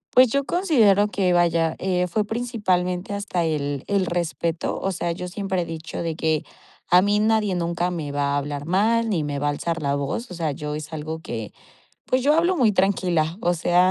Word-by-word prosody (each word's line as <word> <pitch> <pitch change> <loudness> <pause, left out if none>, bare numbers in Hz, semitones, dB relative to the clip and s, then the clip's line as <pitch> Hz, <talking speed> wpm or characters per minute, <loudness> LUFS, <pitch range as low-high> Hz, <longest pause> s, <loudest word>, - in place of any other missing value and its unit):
Pues, 255 -1 +7
yo 280 0 +1
considero 230 - +3
que, 190 -3 +1
vaya, 170 -2 +2
eh, 180 -1 0
fue 210 +4 0
principalmente 205 -5 -1
hasta 200 -4 -1
el 145 -3 -2
el 200 -2 +1
respeto, 170 -1 -2
o 195 - -1
sea, 175 -1 -2
yo 180 +1 -5
siempre 190 -1 -2
he - - -3
dicho 165 0 -6
de 165 -2 -2
que: 160 -2 0 0.5
"A 180 +1 +7
mí, 205 +1 +2
nadie, 215 -2 +2
nunca, 175 +1 -1
me 155 -5 -4
va 140 0 0
a - - +2
hablar 145 0 -4
mal, 225 +6 +2
ni 170 -7 0
me 145 -1 -3
va 145 - 0
a - - +3
alzar 165 +2 -3
la 140 0 +1
voz". 140 - -3
O - - -5
sea, 165 -3 -2
yo, 150 +1 -5
es 155 +1 -6
algo 160 +1 -4
que, 170 - -6 0.5
pues, 255 0 +1
yo 295 +2 +4
hablo 345 +3 +2
muy 235 -7 +4
tranquila, 180 -4 +1
o 175 - +2
sea, 175 +2 +3
180 Hz, 210 wpm, -23 LUFS, 160-205 Hz, 0.5 s, Pues